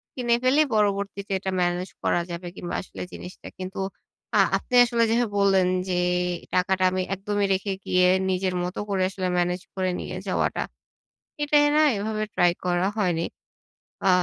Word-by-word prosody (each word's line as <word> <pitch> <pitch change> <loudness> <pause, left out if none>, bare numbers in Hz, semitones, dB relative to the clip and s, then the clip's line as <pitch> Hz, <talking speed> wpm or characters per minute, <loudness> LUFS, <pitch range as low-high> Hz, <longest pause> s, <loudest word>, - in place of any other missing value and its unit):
কিনে 240 -2 +2
ফেলেই 285 +4 +4
পরবর্তীতে 200 -1 0
এটা 190 0 -3
ম্যানেজ 175 +1 0
করা - - +2
যাবে 175 +1 -6
কিংবা 175 - -5
আসলে - - -10
জিনিসটা 180 - -9
কিন্তু 185 +2 -6 0.6
আ - - +5 0.2
আপনে 250 - -4
আসলে 235 -1 +1
যেভাবে 230 -2 +1
বললেন 195 -2 +4 0.2
যে 185 - 0 0.6
টাকাটা 185 +1 +2
আমি 185 0 0
একদমই 205 +1 -1
রেখে 195 +1 -1
গিয়ে 180 0 +3 0.2
নিজের 185 0 0
মত 180 +1 -4
করে 195 -2 0
আসলে 190 -1 -3
ম্যানেজ 180 +1 0
করে 185 -1 0
নিয়ে - - -5
যাওয়াটা। - - 0 0.8
এটাই 295 0 +4
না 310 - +5 0.2
এভাবে 215 +1 -2
ট্রাই 175 0 +4
করা 180 +1 +1
হয়নি। 175 -5 +1 0.8
আ - - +6
190 Hz, 155 wpm, -25 LUFS, 180-210 Hz, 0.8 s, আ